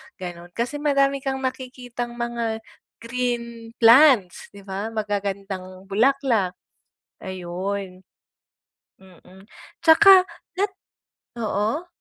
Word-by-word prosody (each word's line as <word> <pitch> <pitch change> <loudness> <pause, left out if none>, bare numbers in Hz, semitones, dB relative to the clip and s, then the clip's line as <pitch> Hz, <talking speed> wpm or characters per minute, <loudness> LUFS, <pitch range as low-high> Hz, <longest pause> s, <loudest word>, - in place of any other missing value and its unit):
gano'n. 175 -1 -9
Kasi 245 +5 -2
madami 275 -1 +2
kang 265 0 -3
nakikitang 250 -2 -5
mga 235 -2 -3 0.4
green 235 -1 -4
plants, 235 - +5
'di 200 - -12
ba? 195 +2 -4
Magagandang 195 -3 -4
bulaklak, 220 -2 +1 0.7
ayun. 185 +1 -5 1.0
Mm, 190 0 -18 0.4
'tsaka 375 +3 +8 0.3
nat 390 +1 0 0.7
oo? 220 - -1
225 Hz, 85 wpm, -23 LUFS, 190-260 Hz, 1.0 s, tsaka